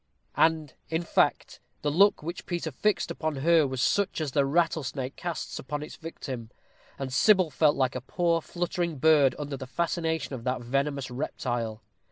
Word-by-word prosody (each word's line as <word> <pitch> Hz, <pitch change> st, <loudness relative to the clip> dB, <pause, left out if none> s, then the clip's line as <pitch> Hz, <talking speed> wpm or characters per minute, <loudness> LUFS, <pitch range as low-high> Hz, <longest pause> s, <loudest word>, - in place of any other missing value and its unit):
And, 160 Hz, -3 st, +2 dB, 0.2 s
in 165 Hz, +1 st, -1 dB
fact, -, -, +1 dB, 0.2 s
the 145 Hz, -, +1 dB
look 195 Hz, +2 st, +4 dB
which 170 Hz, +2 st, -6 dB
Peter 175 Hz, -3 st, -2 dB
fixed 205 Hz, +5 st, 0 dB
upon 155 Hz, -2 st, -2 dB
her 160 Hz, +2 st, +4 dB
was 130 Hz, -2 st, -2 dB
such 200 Hz, -4 st, +1 dB
as 155 Hz, -4 st, -2 dB
the 140 Hz, 0 st, +2 dB
rattlesnake 140 Hz, -4 st, 0 dB
casts 175 Hz, -2 st, -4 dB
upon 145 Hz, +3 st, -4 dB
its 150 Hz, -, -9 dB
victim, 130 Hz, -8 st, -7 dB, 0.5 s
and 135 Hz, -2 st, -4 dB
Sybil 185 Hz, +1 st, +4 dB
felt 150 Hz, +1 st, +3 dB
like 130 Hz, -2 st, +1 dB
a 130 Hz, -, -4 dB
poor 170 Hz, +5 st, 0 dB
fluttering 175 Hz, -1 st, -2 dB
bird 145 Hz, -2 st, +5 dB
under 145 Hz, -2 st, -4 dB
the 130 Hz, -1 st, -7 dB
fascination 160 Hz, -1 st, -1 dB
of 125 Hz, -3 st, -6 dB
that 125 Hz, 0 st, -1 dB
venomous 140 Hz, +2 st, -1 dB
reptile. 120 Hz, -4 st, -3 dB
150 Hz, 170 wpm, -28 LUFS, 130-165 Hz, 0.5 s, bird